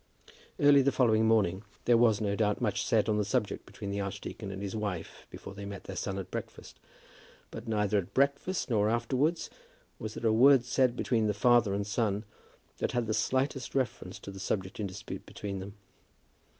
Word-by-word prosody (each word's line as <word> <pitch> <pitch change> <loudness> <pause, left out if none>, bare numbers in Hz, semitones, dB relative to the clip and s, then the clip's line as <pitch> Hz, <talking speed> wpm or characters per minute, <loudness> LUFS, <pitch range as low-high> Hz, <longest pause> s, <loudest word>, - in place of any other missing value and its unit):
Early 145 -2 +7
on 135 - +2
the 140 - +4
following 110 -4 +3
morning 100 -4 +2 0.2
there 120 - +5
was, 115 -3 +4
no 100 -1 0
doubt, 105 -1 +1
much 105 -5 0
said 115 -4 +2
on 105 -1 +1
the - - +2
subject 105 0 -2
between 100 -3 -6
the 100 - -2
archdeacon 100 +1 -5
and 95 0 -6
his 100 +1 -4
wife 100 -6 -5
before - - -9
they 100 +1 -8
met 100 -1 -7
their 95 - -7
son 95 0 -3
at 95 -1 -6
breakfast; - - -7 0.7
but - - -8
neither 105 -2 +1
at 90 - -6
breakfast 140 +7 +1
nor 105 -4 +2
afterwards 130 +8 0 0.5
was 110 0 -6
there - - -5
a 110 - +4
word 130 +2 +6
said 125 -1 +2
between 115 -3 +1
the 105 - 0
father 120 -3 +4
and 100 0 -2
son 105 -1 0 0.6
that - - -1
had 120 -1 0
the 110 - -1
slightest 130 +3 -1
reference 120 -8 -2
to 100 - -9
the 95 - -9
subject 95 0 -3
in 105 - -1
dispute 95 +2 -7
between 100 -2 -5
them. 100 +2 -8
110 Hz, 200 wpm, -30 LUFS, 100-120 Hz, 0.7 s, Early